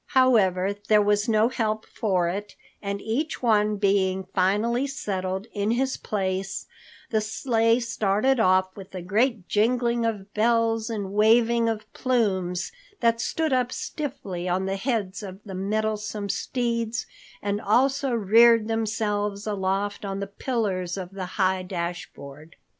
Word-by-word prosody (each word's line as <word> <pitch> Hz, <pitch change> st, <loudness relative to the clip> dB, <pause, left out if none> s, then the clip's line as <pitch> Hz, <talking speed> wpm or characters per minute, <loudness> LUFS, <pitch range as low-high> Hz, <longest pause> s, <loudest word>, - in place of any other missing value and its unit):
However, 200 Hz, -7 st, +4 dB
there 215 Hz, -1 st, +6 dB
was 205 Hz, +2 st, +2 dB
no 220 Hz, 0 st, +4 dB
help 220 Hz, -4 st, -1 dB
for 185 Hz, -5 st, 0 dB
it, 200 Hz, +4 st, -4 dB, 0.3 s
and 200 Hz, 0 st, -3 dB
each 260 Hz, +7 st, -2 dB
one 210 Hz, -2 st, +3 dB
being 195 Hz, -2 st, +1 dB
finally 215 Hz, +8 st, +1 dB
settled 190 Hz, -7 st, -3 dB
in 205 Hz, 0 st, -1 dB
his 260 Hz, +3 st, +1 dB
place, 195 Hz, -1 st, -3 dB, 0.5 s
the 220 Hz, -1 st, +2 dB
sleigh 230 Hz, +1 st, +1 dB
started 225 Hz, +2 st, +1 dB
off 185 Hz, -2 st, +3 dB
with 190 Hz, -1 st, -11 dB
a 180 Hz, -, -5 dB
great 215 Hz, +1 st, +1 dB
jingling 235 Hz, +2 st, +1 dB
of 205 Hz, -3 st, -5 dB
bells 225 Hz, 0 st, +2 dB
and 200 Hz, -4 st, -4 dB
waving 230 Hz, +2 st, +4 dB
of 220 Hz, -1 st, -3 dB
plumes 190 Hz, -8 st, 0 dB, 0.3 s
that 230 Hz, 0 st, +2 dB
stood 315 Hz, +1 st, 0 dB
up 250 Hz, -1 st, +1 dB
stiffly 225 Hz, -, -4 dB
on 185 Hz, +2 st, 0 dB
the 195 Hz, 0 st, -1 dB
heads 200 Hz, -3 st, -2 dB
of 190 Hz, -2 st, -8 dB
the 195 Hz, -, -7 dB
mettlesome 210 Hz, +1 st, -2 dB
steeds 235 Hz, 0 st, -1 dB, 0.3 s
and 205 Hz, +1 st, -2 dB
also 270 Hz, +5 st, +2 dB
reared 230 Hz, 0 st, +5 dB
themselves 210 Hz, -2 st, -1 dB
aloft 200 Hz, 0 st, -1 dB
on 195 Hz, -1 st, -3 dB
the 200 Hz, -, -2 dB
pillars 200 Hz, -4 st, -2 dB
of 185 Hz, -1 st, -6 dB
the 195 Hz, -1 st, -5 dB
high 190 Hz, -1 st, +2 dB
dashboard. 170 Hz, -4 st, -6 dB
210 Hz, 140 wpm, -25 LUFS, 190-230 Hz, 0.5 s, there